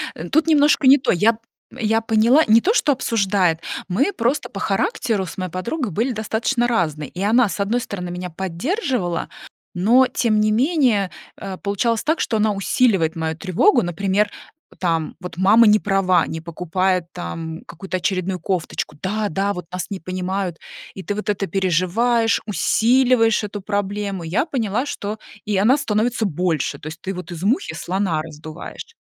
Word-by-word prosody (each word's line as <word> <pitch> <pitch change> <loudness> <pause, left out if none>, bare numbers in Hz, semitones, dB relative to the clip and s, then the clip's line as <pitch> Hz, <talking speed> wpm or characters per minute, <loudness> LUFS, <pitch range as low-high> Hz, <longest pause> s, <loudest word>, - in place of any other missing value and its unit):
Э, 170 +2 -7
тут 320 +2 +2
немножко 295 -3 +4
не 275 +2 +9
то. 255 - 0
Я 210 +6 +3
п 220 - -15 0.4
я 225 +1 +2
поняла, 225 +7 +4
не 225 +2 +6
то, 430 - +2
что 300 - +3
обсуждает. 195 -9 +1 0.3
Мы 275 - +1
просто 255 +3 0
по 195 - -9
характеру 195 +1 0
с 180 - -9
моей 185 -2 -4
подругой 235 - -3
были 235 +9 0
достаточно 225 +3 -1
разные. 155 - -1
И 180 - -7
она, 225 +2 +3
с - - -5
одной 225 +5 0
стороны, 180 -5 -5
меня 180 0 -5
поддерживала, 190 - -2 0.5
но 235 +8 +4
тем 215 -3 +1
не 215 0 +2
менее, 245 - +2 0.2
а, 195 -2 -7
получалось 215 +3 -1
так, 315 +2 +1
что 220 - 0
она 215 0 +2
усиливает 195 -5 +1
мою 160 0 -2
тревогу. 195 - +3
Например, 195 +4 0 0.5
там 165 -3 -1
вот 180 -2 -8
мама 215 +5 +6
не 210 0 +6
права, 190 -4 +2
не 160 - -5
покупает 180 +2 -1
там 160 - -6
какую-то 185 +2 -5
очередную 185 0 -1
кофточку: 175 -4 -3
"Да, 210 +2 -1
да, 195 +4 0
вот 180 -3 -7
нас 180 0 -4
не 195 - -5
понимают!" 185 +1 -3 0.4
И 190 - -8
ты 205 - -3
вот 210 - -5
это 200 -1 -1
переживаешь, 195 +7 +1
усиливаешь 225 +4 +3
эту 205 0 -5
проблему. 200 -2 -3
И 160 - -6
я 230 - +1
поняла, 245 - -1
что 215 -6 -5 0.3
и 205 -2 0
она 220 +7 +4
становится 225 -3 0
больше, 175 -4 -1
то 155 - -9
есть 160 +2 -8
ты 190 +1 -4
вот 180 0 -8
из 170 +2 -7
мухи 255 - 0
слона 180 -4 -1
раздуваешь. 155 +1 -9
200 Hz, 175 wpm, -21 LUFS, 180-230 Hz, 0.5 s, не